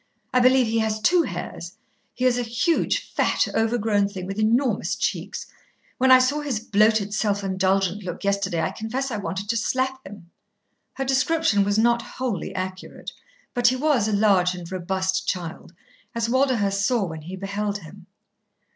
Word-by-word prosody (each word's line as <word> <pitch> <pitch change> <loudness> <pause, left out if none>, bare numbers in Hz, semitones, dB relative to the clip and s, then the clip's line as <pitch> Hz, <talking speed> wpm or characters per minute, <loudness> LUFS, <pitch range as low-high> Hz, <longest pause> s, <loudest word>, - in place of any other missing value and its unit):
I 255 - +4
believe 255 0 +5
he 225 0 0
has 220 -1 0
two 345 +11 +4
hairs. - - -6 0.4
He 255 - -1
is 245 -1 +3
a - - +1
huge, 240 +9 0
fat, - - +1
overgrown 225 -3 +1
thing 190 -3 -7
with 195 +3 -5
enormous 230 +1 +1
cheeks. - - -3 0.5
When 260 +1 +4
I 255 - +10
saw 260 +4 +1
his 275 -7 -2
bloated 215 -1 +2
self 205 -2 0
indulgent 190 0 0
look 180 +1 -6
yesterday, 200 -4 0
I - - -1
confess 250 +5 -4
I 215 - -2
wanted 200 0 -4
to 230 - +1
slap 260 +4 -1
him." 190 -3 -12 0.6
Her 270 - -3
description 265 -4 +2
was 205 +1 0
not 235 +1 +3
wholly 240 -4 -4
accurate, 185 0 -6 0.4
but 245 -1 +3
he 255 - +4
was 260 -6 +2
a - - -1
large 195 -4 +3
and 175 0 -9
robust 190 +1 -2
child, 170 -3 -4 0.4
as 230 -1 0
Walderhurst 230 -6 +1
saw 235 -1 +2
when 160 -3 -7
he 175 +5 -7
beheld 200 +1 -3
him. 185 +1 -13
215 Hz, 170 wpm, -24 LUFS, 195-245 Hz, 0.6 s, I